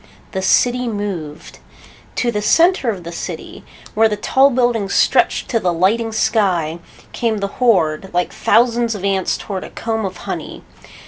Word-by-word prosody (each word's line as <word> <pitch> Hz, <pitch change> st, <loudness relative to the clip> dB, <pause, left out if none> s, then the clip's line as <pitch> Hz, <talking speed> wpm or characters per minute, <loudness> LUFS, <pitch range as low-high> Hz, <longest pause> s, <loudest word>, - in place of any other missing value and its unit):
The 190 Hz, -, -3 dB
city 245 Hz, +6 st, +2 dB
moved. 195 Hz, -8 st, -5 dB, 0.6 s
To 240 Hz, -, 0 dB
the 210 Hz, -2 st, -2 dB
center 330 Hz, -, +3 dB
of 195 Hz, -5 st, -4 dB
the 170 Hz, -, -7 dB
city, 170 Hz, -, -7 dB, 0.3 s
where 220 Hz, +1 st, +4 dB
the 210 Hz, -, -2 dB
tall 265 Hz, +6 st, +3 dB
buildings 240 Hz, -6 st, 0 dB
stretched -, -, +2 dB
to 230 Hz, -, +1 dB
the 180 Hz, -4 st, 0 dB
lighting 210 Hz, +7 st, +1 dB
sky, 180 Hz, -7 st, 0 dB, 0.3 s
came 230 Hz, -3 st, -1 dB
the 200 Hz, -, -2 dB, 0.2 s
horde, 190 Hz, -7 st, +2 dB
like 180 Hz, 0 st, -1 dB
thousands 235 Hz, -1 st, +2 dB
of 200 Hz, -1 st, -5 dB
ants 195 Hz, -2 st, 0 dB
toward 190 Hz, -2 st, -5 dB
a -, -, -8 dB
comb 225 Hz, -1 st, -3 dB
of 190 Hz, -, -5 dB
honey. -, -, -6 dB
210 Hz, 160 wpm, -18 LUFS, 185-235 Hz, 0.6 s, where